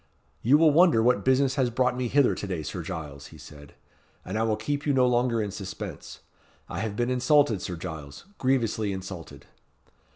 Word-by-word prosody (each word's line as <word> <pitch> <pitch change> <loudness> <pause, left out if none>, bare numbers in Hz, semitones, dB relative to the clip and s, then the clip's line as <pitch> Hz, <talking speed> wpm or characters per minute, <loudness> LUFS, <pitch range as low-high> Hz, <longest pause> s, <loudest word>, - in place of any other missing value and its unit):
"You 130 +6 +5
will 160 -1 +5
wonder 160 -7 +5
what 125 +1 +2
business 130 +1 +3
has 125 - +2
brought 125 +1 +1
me 125 -1 -2
hither 140 +2 +3
to 100 - -5
day, 90 -5 -3
Sir - - -5
Giles," 70 -3 -7
he - - -14
said; 75 -1 -14 0.5
"and 95 - -5
I 110 - 0
will 110 -1 +1
keep 140 +7 -3
you 145 - +3
no 130 -1 +4
longer 120 -2 +1
in 100 - -4
suspense. 95 -1 -8 0.5
I - - -5
have 110 -1 -3
been 120 +3 -1
insulted, 130 - +3
Sir 90 - -4
Giles 75 -4 -8
grievously 115 -6 0
insulted." 90 -7 -8
115 Hz, 190 wpm, -26 LUFS, 95-130 Hz, 0.5 s, You